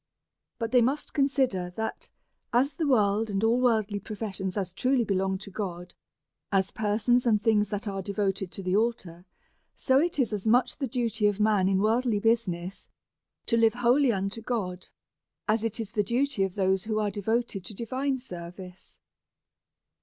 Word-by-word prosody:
But 230 -2 -3
they 250 -1 +5
must 270 +5 -1
consider, 265 - +1
that 220 0 -4 0.4
as 260 +4 +2
the 320 - -2
world 215 -4 +2
and 200 0 -1
all 235 +3 +3
worldly 215 -4 +1
pro 210 +2 -7
fessions 195 -3 -4
as 185 -3 -3
truly 255 +3 +2
belong 190 -2 0
to 200 - -10
God 180 -3 -5 0.6
as 195 -1 +2
persons 220 +4 +1
and 215 -2 +4
things 210 -2 +2
that 205 +1 -4
arc 195 -2 -4
devoted 195 -2 -1
to 195 - -6
the 185 +1 0
altar; 195 -6 -1 0.5
so 265 0 +3
it 335 +1 0
is 245 -6 +1
as 210 +1 -3
much 245 +3 +3
the 270 - -1
duty 230 -3 0
of 205 0 -1
men 210 -3 +3
in 195 - +2
worldly 230 +1 +2
business 195 -5 -1 0.6
to 230 - +2
live 225 -1 +4
wholly 245 +2 +3
unto 195 +2 -3
God, 195 -7 -3 0.6
as 220 0 +2
it 225 0 -2
is 220 -3 -4
the 210 - +1
duty 245 +3 0
of 190 - -6
those 190 0 +1
who 215 -1 -1
are 210 -1 0
devoted 220 -1 -1
to 210 - -8
divine 260 +5 -2
service. 180 -4 -10
215 Hz, 175 wpm, -27 LUFS, 195-240 Hz, 0.6 s, they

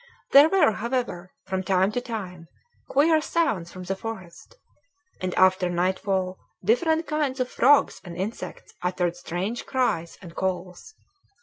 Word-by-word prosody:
There 285 +3 +8
were, 360 -9 +4
however, 225 -6 -3 0.2
from 190 0 -2
time 190 +1 +2
to 245 - -2
time, 185 -8 -6 0.4
queer 310 +3 +4
sounds 275 - 0
from 185 - -8
the 190 +2 -2
forest, 190 - -8 0.7
and 185 0 -1
after 185 -1 +4
nightfall 185 +1 -1 0.3
different 320 - +2
kinds 295 -4 -1
of 255 0 -1
frogs 285 +3 +4
and 175 -2 -9
insects 200 +5 -6
uttered 180 -1 -1
strange 180 +6 -4
cries 245 -11 -1
and 175 -3 -11
calls. 185 - -4
190 Hz, 135 wpm, -25 LUFS, 180-255 Hz, 0.7 s, There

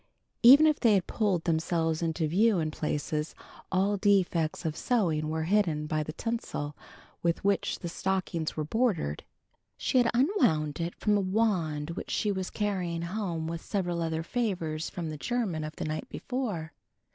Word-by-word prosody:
Even 275 +6 +9
if 305 -1 +3
they 225 -4 +5
had 185 -3 +1
pulled 195 -7 0
themselves 165 0 0
into 165 0 0
view 205 +6 +3
in 155 -2 -1
places, 150 0 -2 0.4
all 195 +2 +2
defects 180 -6 +1
in 160 - 0
sewing 160 -8 0
were 160 0 -1
hidden 165 -4 +1
by 155 0 -1
the 155 - -4
tinsel 160 -7 -4 0.5
with 170 -1 0
which 200 0 +1
the 175 - -6
stockings 175 -3 -2
were 155 - 0
bordered. 175 - 0 0.5
She 255 - +2
had 240 -1 +4
unwound 230 - +2
it 170 +1 -3
from 210 -1 +2
a - - +1
wand 185 -7 0
which - - -6
she 210 - 0
was 190 -2 -3
carrying 180 -5 -2
home 170 -3 -3
with 165 0 -4
several 175 -4 -2
other 160 -1 -1
favors 170 -8 -2
from 165 -3 -5
the 155 - -6
german 205 -5 -1
of 155 0 -6
the - - -4
night 155 0 -4
before. 210 -12 -3
175 Hz, 170 wpm, -29 LUFS, 160-205 Hz, 0.5 s, Even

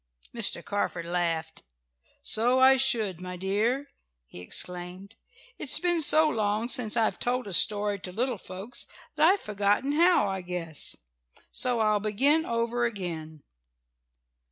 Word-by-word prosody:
'" - - -20
Mr. 230 -3 +4
Carford 200 -4 -2
laughed. 170 -2 -2 0.6
"So 245 +4 +2
I 260 +1 +6
should, 220 -9 0
my 180 0 -6
dear!" 220 +9 -1 0.3
he - - -12
exclaimed. 180 - -5 0.5
"It's - - +1
been 350 -2 +1
so 310 +1 +4
long 215 -3 -1
since 240 -4 -1
I've 225 -1 +1
told 250 +1 -1
a 200 - -6
story 205 +2 +2
to 185 - -8
little 240 +2 -2
folks 190 +8 -8 0.3
that 310 - +4
I've 405 - -4
forgotten 205 +6 0
how, 335 - +4
I 190 -1 -3
guess. 175 -4 -4 0.6
"So 245 -2 0
I'll 215 -1 +2
begin 270 +10 +1
over 235 +1 -1
again. 165 -9 -5
210 Hz, 140 wpm, -27 LUFS, 180-250 Hz, 0.6 s, I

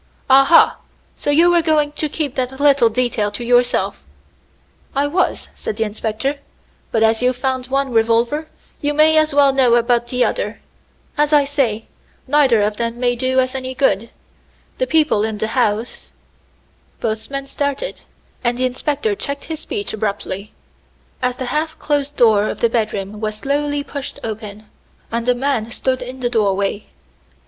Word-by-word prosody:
"Aha! 275 +5 +6 0.4
so - - -4
you 330 +4 +5
were 345 -1 +4
going 305 -2 +2
to 300 0 -3
keep 290 -3 -3
that 260 +1 -3
little 280 -5 +5
detail 225 -3 0
to 205 +3 -6
yourself." 245 - +1 0.9
"I 280 +1 +2
was," 345 +6 0
said 210 - -5
the 225 - +1
inspector, 220 +6 -3 0.5
"but 225 - +2
as 220 +1 +3
you've 250 0 +1
found 260 -1 -2
one 275 0 0
revolver, 235 +7 +1 0.3
you 290 0 -1
may 310 +1 +5
as 310 0 +1
well 280 -1 +4
know 255 -3 +4
about 240 0 +2
the 250 0 +1
other. - - -3 0.6
As 295 0 +3
I 290 -1 +5
say, 255 -6 -1 0.4
neither 260 -6 +3
of 210 0 -1
them 230 0 -3
may 245 -1 +1
do 260 +1 +1
us 255 0 +1
any 260 -1 -5
good. 230 -5 +1 0.7
The - - +1
people 310 -10 +2
in 220 -1 -2
the 220 +1 -2
house 225 -1 -1 0.4
" - - -38
Both 220 -1 -3
men 275 0 -4
started, 285 - -3 0.4
and 240 0 +1
the 255 - +1
inspector 290 - -1
checked 280 -8 -5
his 320 -2 -5
speech 205 -10 -4
abruptly, 205 -1 -3 0.7
as 250 -1 0
the 260 - -4
half 315 +1 -1
closed 290 -1 -1
door 215 -3 +4
of - - -5
the 235 - +2
bedroom 210 -3 -2
was 215 -1 -2
slowly 285 +4 -1
pushed 280 -1 -7
open, 215 -1 -6 0.5
and 235 +2 -1
a 250 - +4
man 245 -3 -1
stood 255 +2 -1
in 255 +1 -7
the 245 - 0
doorway. 200 -2 0
255 Hz, 170 wpm, -19 LUFS, 225-285 Hz, 0.9 s, Aha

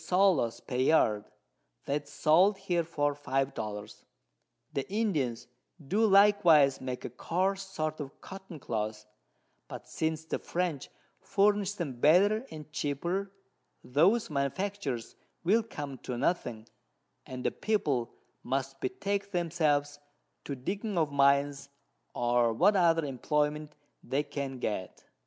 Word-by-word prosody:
_ 180 -11 +2
per 125 - -3
Yard, 120 -6 +3 0.6
that 145 +1 -1
is - - -17
sold 170 +7 +4
here 180 -3 0
for 145 -3 0
5 135 -1 -1
Dollars. 105 -2 -6 0.7
The 135 - -3
Indians 155 - 0 0.3
do 200 +10 +1
likewise 195 -9 +5
make 130 -1 -5
a - - -3
coarse 185 +9 -1
sort 155 -5 -4
of 140 -2 -7
Cotton 190 -4 -10
Cloth; 110 -3 -3 0.6
but - - -9
since 160 0 -2
the - - -3
French 175 -6 -2 0.3
furnish 205 0 +2
them 145 -11 -5
better 205 - +4
and 155 -1 -9
cheaper, 170 +8 -2 0.5
those 175 - +3
Manufactures 140 - -2 0.3
will 210 +7 +4
come 145 - -7
to 125 - -5
nothing, 120 -6 -1 0.6
and 125 -1 -6
the - - +1
People 145 - 0 0.3
must 135 +1 -3
betake 200 +9 -2
themselves 155 -5 0 0.5
to 140 - -4
digging 200 - -3
of 155 -3 +1
Mines, 140 0 +2 0.5
or 120 -1 +2
what 205 - +4
other 165 -4 +3
Imployment 150 +3 -1 0.3
they 140 +2 0
can 140 -2 -5
get. 105 -6 -4
150 Hz, 125 wpm, -30 LUFS, 135-190 Hz, 0.7 s, likewise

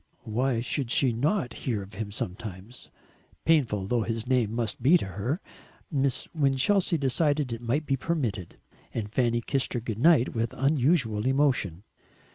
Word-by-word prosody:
Why 120 +2 0
should 125 +1 -2
she 125 0 +3
not 135 - 0 0.2
hear 105 -5 -1
of 95 - -13
him 105 +2 -4
sometimes 100 +2 -6 0.6
painful 125 -12 +2
though 120 +3 +1
his 115 0 -3
name 125 -4 +1
must 115 -1 -2
be 150 +9 +6
to - - -4
her? 105 - -3 0.5
Miss 135 -3 0
Winchelsea 160 +5 +2
decided 145 -1 +1
it 115 - -6
might 130 +6 -1
be 135 -2 0
permitted, 120 - -3 0.4
and 105 -2 -4
Fanny 120 -2 +1
kissed 135 +3 -1
her 120 - 0
good 110 -2 -5
night 150 -3 +4
with 115 -1 -2
unusual 130 -5 +2
emotion. 130 - +1
125 Hz, 155 wpm, -27 LUFS, 110-140 Hz, 0.6 s, be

